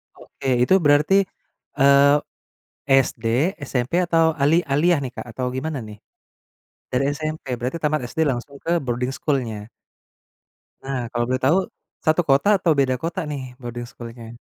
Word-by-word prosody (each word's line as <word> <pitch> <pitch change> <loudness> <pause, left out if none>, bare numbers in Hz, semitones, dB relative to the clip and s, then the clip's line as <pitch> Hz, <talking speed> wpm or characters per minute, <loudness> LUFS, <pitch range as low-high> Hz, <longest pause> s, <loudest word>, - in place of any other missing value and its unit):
Oke. 135 - -7
Itu 190 +9 +4
berarti, 155 +5 +4 0.5
eee, 140 +1 +6 0.7
SD, 135 +3 +2
SMP 125 +3 -2
atau 165 -1 +3
ali 150 +4 +4
aliyah 155 +4 +3
nih 125 - -5
Kak, - - -6
atau 125 +3 -3
gimana 145 +2 -3
nih? 105 -1 -10 0.9
Dari 130 +1 +1
SMP, 155 0 -4
berarti 125 +7 -3
tamat 155 -1 +1
SD 160 - -1
langsung 130 +2 -4
ke 170 +1 +1
boarding 125 -4 -2
school-nya? 115 -7 -2 1.1
Nah, 130 -3 -3
kalau 120 0 0
boleh 130 +1 -1
tahu 145 +7 +4 0.5
satu 155 +2 +3
kota 140 +6 +4
atau 170 - +3
beda 130 -2 +2
kota 165 +3 -3
nih 145 -2 -4 0.2
boarding 120 0 -6
school-nya? 115 -1 -10
135 Hz, 145 wpm, -22 LUFS, 125-155 Hz, 1.1 s, eee